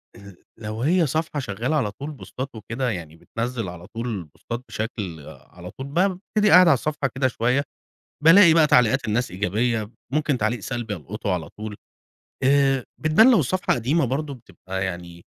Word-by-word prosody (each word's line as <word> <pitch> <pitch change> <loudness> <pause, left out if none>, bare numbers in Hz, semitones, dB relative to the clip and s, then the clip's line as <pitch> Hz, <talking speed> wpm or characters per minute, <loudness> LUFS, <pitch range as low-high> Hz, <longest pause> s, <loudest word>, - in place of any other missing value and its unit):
ال 100 -3 -13 0.2
لو 110 0 -6
هي 165 +3 +3
صفحة 155 +1 -2
شغالة 120 +4 -2
على 115 -9 0
طول 140 +8 -7
بوستات 130 -1 -7
وكده 115 +4 -3
يعني 80 -6 -6
بتنزّل 115 +2 -4
على 90 0 -10
طول 115 -5 -4
بوستات 115 +10 -7
بشكل 105 -7 -5
على 90 +1 -12
طول 135 +1 -8
بابتدي 190 +5 +1
أقعد 180 -1 +8
على 160 - +7
الصفحة 145 +1 -1
كده 130 0 +2
شوية 125 +3 0 0.6
بالاقي 170 0 +8
بقى 160 -2 +5
تعليقات 125 +1 +3
الناس 115 +1 0
إيجابية، 105 +4 -1 0.2
ممكن 150 -3 +1
تعليق 110 +2 0
سلبي 120 -2 -4
ألقطه 100 +4 -4
على 80 -4 -4
طول، 105 0 -8 0.7
آآ 135 -1 +3 0.2
بتبان 190 +11 +5
لو 230 - +5
الصفحة 185 +7 0
قديمة 135 +6 +1
برضه 140 +3 -2
بتبقى 95 -5 -6
يعني 85 -1 -6
120 Hz, 165 wpm, -23 LUFS, 105-145 Hz, 0.7 s, أقعد